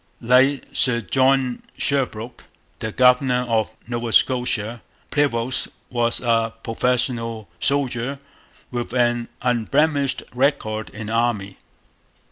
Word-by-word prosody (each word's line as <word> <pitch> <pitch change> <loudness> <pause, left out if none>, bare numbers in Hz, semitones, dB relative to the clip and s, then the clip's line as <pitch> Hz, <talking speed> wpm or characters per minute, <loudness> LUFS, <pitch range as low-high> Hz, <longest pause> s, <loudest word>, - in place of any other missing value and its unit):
Like 130 +4 +3
Sir 120 -3 +2
John 130 +2 +2 0.2
Sherbrooke, 125 -4 -2 0.3
the 110 - -3
governor 125 +1 +3
of 110 -2 +1 0.2
Nova 120 -1 -3
Scotia, 120 -3 +2 0.3
Prevost 130 -4 +1 0.2
was 120 -1 +1
a 115 -2 +2
professional 115 -2 -1
soldier 135 -1 0 0.5
with 120 -1 -4
an 120 -1 +2 0.2
unblemished 135 +4 +1
record 125 -5 0
in 110 0 -8
the 110 - -4
Army. 110 -4 0
120 Hz, 100 wpm, -22 LUFS, 115-130 Hz, 0.5 s, Like